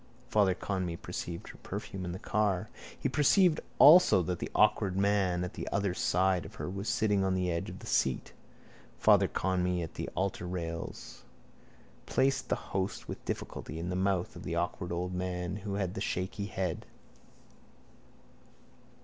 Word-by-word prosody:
Father 100 Hz, -4 st, +3 dB
Conmee 95 Hz, -4 st, -3 dB
perceived 85 Hz, -1 st, -6 dB
her -, -, -12 dB
perfume 95 Hz, -1 st, -5 dB
in 90 Hz, -, -3 dB
the 90 Hz, -, -5 dB
car. 105 Hz, -1 st, 0 dB, 0.3 s
He -, -, 0 dB
perceived 155 Hz, +5 st, +4 dB, 0.2 s
also 150 Hz, -, +8 dB
that 90 Hz, 0 st, -2 dB
the -, -, -4 dB
awkward 105 Hz, -3 st, +3 dB
man 95 Hz, -3 st, +2 dB
at 90 Hz, -, -5 dB
the -, -, -5 dB
other 100 Hz, -2 st, 0 dB
side 90 Hz, -1 st, +2 dB
of -, -, -11 dB
her -, -, -5 dB
was 100 Hz, +3 st, -4 dB
sitting 105 Hz, -3 st, +2 dB
on 95 Hz, -1 st, +1 dB
the 90 Hz, -1 st, 0 dB
edge 85 Hz, 0 st, -2 dB
of -, -, -8 dB
the -, -, -11 dB
seat. 65 Hz, -2 st, 0 dB, 0.6 s
Father -, -, +5 dB
Conmee 90 Hz, -1 st, 0 dB
at 80 Hz, -, -7 dB
the -, -, -4 dB
altarrails 90 Hz, -3 st, -4 dB, 0.9 s
placed 135 Hz, +1 st, +1 dB
the -, -, +3 dB, 0.2 s
host 95 Hz, 0 st, -2 dB
with -, -, -7 dB
difficulty 80 Hz, -, -5 dB
in 85 Hz, +2 st, -4 dB
the 90 Hz, -, -2 dB
mouth 95 Hz, -1 st, 0 dB
of -, -, -8 dB
the 85 Hz, -, -3 dB
awkward 85 Hz, +1 st, -2 dB
old 90 Hz, +1 st, -2 dB
man 90 Hz, 0 st, -3 dB
who 100 Hz, -1 st, -4 dB
had 95 Hz, -3 st, -1 dB
the 100 Hz, -, -5 dB
shaky 95 Hz, +1 st, -2 dB
head. 95 Hz, -5 st, -3 dB
95 Hz, 165 wpm, -31 LUFS, 90-100 Hz, 0.9 s, also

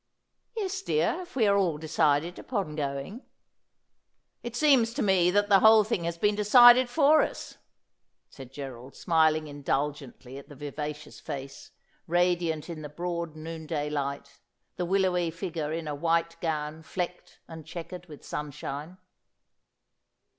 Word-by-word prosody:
' 475 Hz, -, -29 dB
Yes, 390 Hz, -2 st, -2 dB
dear, 450 Hz, +1 st, 0 dB
if 360 Hz, -4 st, -12 dB
we 235 Hz, -5 st, +3 dB
are 200 Hz, -1 st, +4 dB
all 180 Hz, -6 st, +1 dB
decided 155 Hz, +1 st, 0 dB
upon 195 Hz, -11 st, -3 dB
going.' 140 Hz, -, -4 dB, 0.6 s
' -, -, -52 dB, 0.3 s
It 240 Hz, 0 st, -7 dB
seems 245 Hz, -5 st, +3 dB
to -, -, 0 dB
me 190 Hz, -3 st, +3 dB
that 205 Hz, +2 st, +2 dB
the 200 Hz, -2 st, +6 dB
whole 220 Hz, +1 st, +7 dB
thing 200 Hz, -5 st, -2 dB
has 170 Hz, 0 st, -3 dB
been 205 Hz, +4 st, +2 dB
decided 240 Hz, +4 st, +7 dB
for 300 Hz, +3 st, +5 dB
us,' -, -, -5 dB, 0.7 s
said 130 Hz, -2 st, -12 dB
Gerald, 135 Hz, -2 st, -9 dB
smiling 160 Hz, -2 st, +2 dB
indulgently 140 Hz, -2 st, -4 dB
at 140 Hz, -, -15 dB
the 145 Hz, -, -11 dB
vivacious 150 Hz, +1 st, -6 dB
face, 140 Hz, -3 st, -8 dB, 0.4 s
ra 175 Hz, +2 st, +2 dB
diant 160 Hz, -3 st, -3 dB
in 165 Hz, -3 st, -7 dB
the 150 Hz, -, -7 dB
broad 170 Hz, 0 st, -4 dB
noonday 155 Hz, -2 st, -5 dB
light, 140 Hz, -1 st, -4 dB, 0.4 s
the 180 Hz, -, -2 dB
willowy 180 Hz, -2 st, +1 dB
figure 165 Hz, -2 st, -4 dB
in 160 Hz, 0 st, -4 dB
a 150 Hz, -, -3 dB
white 165 Hz, +2 st, 0 dB
gown 155 Hz, -1 st, -3 dB
flecked 180 Hz, +2 st, -6 dB
and 160 Hz, -1 st, -9 dB
chequered 175 Hz, +2 st, -8 dB
with 150 Hz, -3 st, -13 dB
sunshine. 150 Hz, +3 st, -6 dB
165 Hz, 150 wpm, -28 LUFS, 150-195 Hz, 0.7 s, whole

